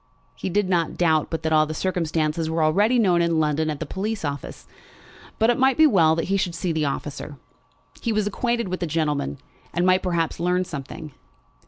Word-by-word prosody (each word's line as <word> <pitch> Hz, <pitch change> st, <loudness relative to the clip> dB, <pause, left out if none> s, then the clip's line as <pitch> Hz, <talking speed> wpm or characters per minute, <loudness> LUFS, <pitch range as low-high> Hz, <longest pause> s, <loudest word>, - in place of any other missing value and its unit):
He -, -, -4 dB
did 205 Hz, +1 st, +1 dB
not 170 Hz, -3 st, 0 dB
doubt 160 Hz, -3 st, +2 dB
but 165 Hz, 0 st, -4 dB
that 160 Hz, 0 st, 0 dB
all 155 Hz, 0 st, +4 dB
the 155 Hz, -, -5 dB
circumstances 160 Hz, -3 st, -1 dB
were 160 Hz, 0 st, 0 dB
already 205 Hz, +10 st, +3 dB
known 180 Hz, -7 st, +3 dB
in 170 Hz, -1 st, +1 dB
London 155 Hz, 0 st, +1 dB
at 150 Hz, -2 st, -3 dB
the -, -, -3 dB
police 205 Hz, -1 st, -3 dB
office; 140 Hz, -1 st, -6 dB, 0.7 s
but 225 Hz, +2 st, +4 dB
it 240 Hz, -, -2 dB
might 265 Hz, 0 st, +3 dB
be 315 Hz, -, +7 dB
well 165 Hz, -, +4 dB
that 165 Hz, -, -1 dB
he 195 Hz, -, +2 dB
should 180 Hz, -3 st, -1 dB
see 170 Hz, +1 st, -2 dB
the 160 Hz, -2 st, 0 dB
officer. 145 Hz, +1 st, -5 dB, 0.6 s
He 230 Hz, -, -1 dB
was 215 Hz, -1 st, +1 dB
acquainted 235 Hz, +2 st, -1 dB
with 185 Hz, 0 st, -3 dB
the 175 Hz, -, -2 dB
gentleman, 150 Hz, -, -1 dB, 0.3 s
and 175 Hz, +1 st, 0 dB
might 185 Hz, 0 st, +4 dB
perhaps 170 Hz, -3 st, -1 dB
learn 180 Hz, +2 st, +1 dB
something. 155 Hz, +1 st, -7 dB
170 Hz, 205 wpm, -23 LUFS, 155-190 Hz, 0.7 s, be